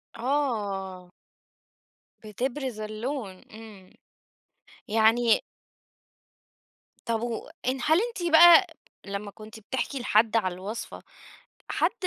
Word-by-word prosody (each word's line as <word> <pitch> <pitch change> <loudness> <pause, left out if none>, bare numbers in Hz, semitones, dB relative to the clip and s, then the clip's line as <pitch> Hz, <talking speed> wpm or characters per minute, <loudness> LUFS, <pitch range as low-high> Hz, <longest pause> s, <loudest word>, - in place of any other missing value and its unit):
آه. 205 -9 -2 1.1
بِتبْرِز 245 +3 -4
اللَّوْن، 215 -1 -5
إمم. 215 -4 -13 1.0
يعني 225 +2 +3 1.7
طب 230 -1 0
وإن 245 +2 -4
هل 315 +3 +4
أنتِ 395 -8 -3
بقى 345 +3 +8 0.4
لما 200 0 -5
كنتِ 215 +1 -12
بتحْكي 260 +5 -4
لحد 225 -1 +2
على 185 -5 0
الوصفة، 200 +5 -7 0.7
حد - - +1
225 Hz, 85 wpm, -26 LUFS, 210-265 Hz, 1.7 s, بقى